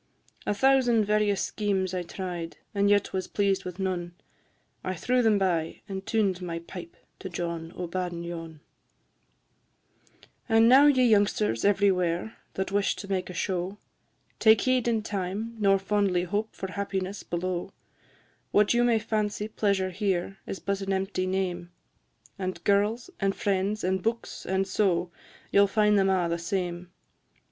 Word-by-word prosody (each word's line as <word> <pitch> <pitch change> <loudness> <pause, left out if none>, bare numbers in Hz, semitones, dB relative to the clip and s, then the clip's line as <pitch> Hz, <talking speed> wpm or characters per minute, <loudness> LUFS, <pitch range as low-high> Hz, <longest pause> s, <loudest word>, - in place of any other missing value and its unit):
A - - +2
thousand 245 -2 +4
various 210 -1 +2
schemes 195 -3 -1
I 180 - -1
tried, 175 -1 -6 0.2
And 200 0 +2
yet 205 -1 +2
was 185 -1 -2
pleased 195 -2 0
with 180 -1 -6
none; 180 -3 -3 0.7
I 185 - -2
threw 250 +9 +1
them 220 -3 +4
by, 170 -4 0
and 190 -1 -5
tuned 200 -4 0
my 170 -2 -4
pipe 170 0 -9 0.2
To 190 - -6
John 170 -1 -4
o' 180 - -4
Badenyon. 170 -2 -4
VI. - - -20 1.9
And 225 0 +6
now, 270 +4 +8
ye 260 -3 +5
youngsters 200 - +2
everywhere, 190 -1 +2 0.2
That 190 0 -2
wish 200 0 +1
to 200 - -8
make 185 -2 -2
a 180 - -7
show, 185 +2 -2 0.6
Take 220 -2 +6
heed 255 -2 +2
in 225 -2 +1
time, 205 +3 -3
nor 195 -1 +4
fondly 195 -2 +1
hope 205 +4 -2
For 190 -1 -5
happiness 195 0 -3
below; 175 0 -3 0.8
What 205 +2 +4
you 240 0 +3
may 240 -2 +4
fancy 215 -1 -1
pleasure 200 -3 0
here, 195 0 -1
Is - - -4
but 200 +1 -2
an 195 0 -2
empty 190 -1 -1
name, 180 -2 -2 0.7
And 185 -1 -4
girls, 210 - +1
and 195 -1 +1
friends, 200 +1 0
and 190 +1 0
books, 230 +2 -3
and 190 0 0
so, 180 -3 +1 0.4
You 200 - +6
'll 200 - +5
find 210 +1 +3
them 195 0 +3
all 185 -2 +2
the 170 0 -1
same. 175 -1 -3
195 Hz, 155 wpm, -27 LUFS, 180-210 Hz, 1.9 s, now